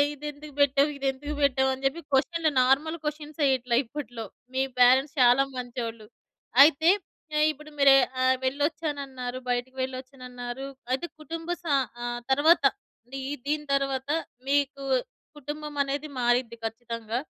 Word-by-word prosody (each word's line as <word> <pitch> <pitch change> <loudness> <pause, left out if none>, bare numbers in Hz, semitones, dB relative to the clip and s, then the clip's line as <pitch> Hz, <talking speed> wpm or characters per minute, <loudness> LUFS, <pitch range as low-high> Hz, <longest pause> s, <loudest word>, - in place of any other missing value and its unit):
ఇదెందుకు 295 +1 -8
బెట్టావు. 285 +1 +4
ఇది 275 0 -4
ఎందుకు 290 +3 -6
బెట్టావు 265 -1 +3
అని 265 +1 -6
జెప్పి 270 +5 0
క్వశ్చన్లు 320 +4 +2
నార్మల్ 290 +6 +2
క్వశ్చన్స్ 300 0 -5
ఏయట్లే 250 -3 +1
ఇప్పట్లో. 235 -3 -6 0.3
మీ 265 - +2 0.2
పేరెంట్స్ 260 +5 +5
చాలా 250 +2 +6
మంచోళ్ళు. 235 -3 -5 0.6
అయితే 320 +3 +4 0.5
ఆహ్, 305 - +5
ఇప్పుడు 300 +1 -14
మీరు 275 -1 +7 0.3
ఆహ్, 260 0 +4
వెళ్లొచ్చానన్నారు, 280 -3 -2
బయటకి 245 +1 -2
వెళ్ళొచ్చానన్నారు 255 0 -6 0.2
అయితే 265 +7 -1
కుటుంబ 330 +2 -7
స - - -40 0.4
ఆహ్, 240 0 -3
తరువాత 305 +4 +5 0.4
అంటే 255 +3 -9
ఈ - - -2 0.2
దీని 300 0 -1
తర్వాత, 275 -1 -1 0.4
మీకు 280 0 +1 0.5
కుటుంబం 295 +1 -6
అనేది 280 +2 -3
మారిద్ది 240 -1 +1
ఖచ్చితంగా. 230 0 -4
270 Hz, 130 wpm, -27 LUFS, 250-295 Hz, 0.6 s, మీరు